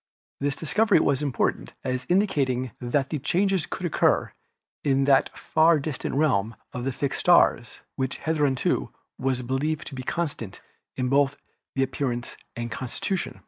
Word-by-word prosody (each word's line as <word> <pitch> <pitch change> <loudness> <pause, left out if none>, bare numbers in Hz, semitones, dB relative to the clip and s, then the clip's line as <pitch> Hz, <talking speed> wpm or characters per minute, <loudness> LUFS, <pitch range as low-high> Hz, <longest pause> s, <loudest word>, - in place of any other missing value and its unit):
This 140 0 0
discovery 210 +8 +3
was 135 - +2
important 140 -5 -1
as 130 0 -2
indicating 135 - +1
that 135 +4 0
changes 190 -1 +1
could 185 - -4
occur 170 - +2 0.5
in 135 -1 +2
that 135 -1 +4
far 160 +1 +4
distant 140 -2 -3
realm 115 -7 +2 0.2
of 125 0 -4
the 135 - 0
fixed 140 +2 -2
stars 170 -9 +3 0.2
which 130 0 -1
hitherto 145 -5 0 0.3
was 130 -1 0
believed 145 +5 -1
to - - -12
be 130 - -4
constant 130 - -3 0.4
both 135 +2 +2 0.4
in 135 - +2
its 130 - -1
appearance 125 -3 -3 0.2
and 120 0 -4
constitution. 170 - -3
135 Hz, 145 wpm, -26 LUFS, 130-155 Hz, 0.5 s, that